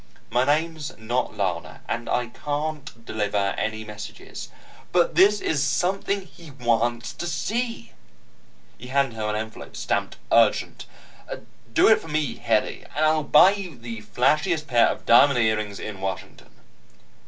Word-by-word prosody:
"My 125 +2 +2
name's 155 +1 -1
not 120 +3 -2
Lana, 90 -4 -3
and 120 0 -3
I 125 - +1
can't 145 -4 -5
deliver 105 -3 -1
any 110 0 -3
messages." 105 0 -9 0.4
"But 175 -2 +3
this 200 +5 +5
is 150 -3 0
something 195 +6 0
he 170 -3 -15
wants 120 -3 0
to 175 - -5
see." 220 - -3 0.9
He 125 - -9
handed 135 -1 +1
her 110 -1 -2
an 105 - -1
envelope, 110 +1 -6
stamped - - -2
URGENT. - - +2 0.8
"Do - - +5
it 220 - +5
for - - -11
me, 150 -3 -2
Hedy. 115 -3 0
And 155 +2 +2
I'll 155 0 +3
buy 150 +6 +7
you 190 -8 -6
the 115 -2 -7
flashiest 150 - +1
pair 120 -5 +4
of - - -4
diamond 135 +3 +6
earrings 110 -3 0
in 100 -3 -7
Washington." 95 -1 -6
125 Hz, 145 wpm, -24 LUFS, 110-155 Hz, 0.9 s, buy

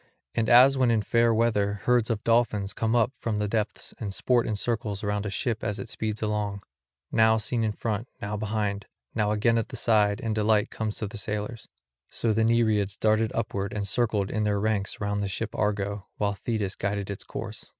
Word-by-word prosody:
And 115 -1 0
as 130 +3 +7
when 130 -2 +4
in 110 -2 +2
fair 115 +3 +3
weather 105 -3 +1
herds 125 -2 +3
of 110 -3 -1
dolphins 110 -4 +2
come 115 +1 0
up 120 0 +3
from 110 -2 -2
the 105 0 0
depths 105 0 -2
and 105 -3 -3
sport 120 +4 +1
in 110 - -1
circles 110 -2 -2
round 105 0 -1
a - - -2
ship 110 +3 -2
as 105 -1 -2
it 100 - -6
speeds 110 0 -3
along, 105 -2 -2 0.5
now 110 0 +4
seen 115 +1 -1
in 110 - +1
front, 110 +2 -3
now 105 +1 -3
behind, 105 -2 -2 0.3
now 105 -2 +1
again 115 +2 +2
at 115 - -3
the - - -7
side 105 -2 +3
and 115 -4 -2
delight 105 0 +2
comes 110 -1 -3
to 110 - -3
the 105 +1 -8
sailors; 105 +3 -4 0.4
so 115 -2 0
the 110 +1 +2
Nereids 110 -4 +2
darted 110 0 +2
upward 100 -3 -2
and 100 -1 -2
circled 105 -2 0
in 110 - -1
their 105 -1 +1
ranks 105 -1 -1
round 100 0 -1
the 100 - -1
ship 105 +4 -4
Argo, 100 -1 -1
while 100 -1 0
Thetis 100 -2 -2
guided 100 0 -2
its 100 - -6
course. - - -7
105 Hz, 205 wpm, -27 LUFS, 100-115 Hz, 0.5 s, as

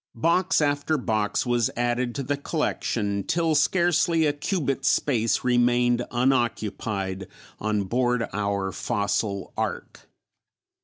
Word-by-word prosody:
Box 170 +8 +2
after 145 +1 +1
box 110 -4 -1
was 120 -2 +1
added 120 0 0
to 140 - -2
the 145 +3 -1
collection 110 - -2
till 165 - +1
scarcely 170 +1 +2
a 145 - +2
cubit's 145 -3 -1
space 115 -5 +1
remained 120 0 +2
unoccupied 110 -6 -1 0.3
on 105 -1 0
board 120 +3 0
our 100 -1 -1
fossil 100 +1 -2
ark. - - -5
120 Hz, 110 wpm, -25 LUFS, 105-145 Hz, 0.3 s, Box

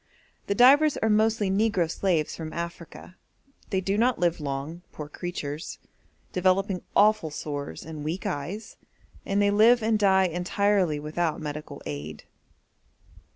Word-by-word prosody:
The 200 - 0
divers 280 +6 +6
are 220 - +1
mostly 215 -2 +2
negro 195 -4 +2
slaves 170 -2 0
from 160 -1 -7
Africa; 170 +1 -7 0.5
they 190 -3 0
do 195 +2 -1
not 245 +1 +3
live 175 -1 +1
long, 145 +4 -4
poor 150 - -7
creatures, 155 -1 -6 0.6
developing 185 +1 +1
awful 210 -5 +4
sores 145 - -6
and 155 -2 -7
weak 160 +5 -4
eyes, 170 +10 -5 0.5
and 200 +1 +1
they 205 0 +3
live 225 +3 +5
and 220 -1 +2
die 190 -2 +4
entirely 180 -1 +1
without 155 +2 -2
medical 150 -1 -7
aid. 75 +1 -6
180 Hz, 135 wpm, -26 LUFS, 155-205 Hz, 0.6 s, divers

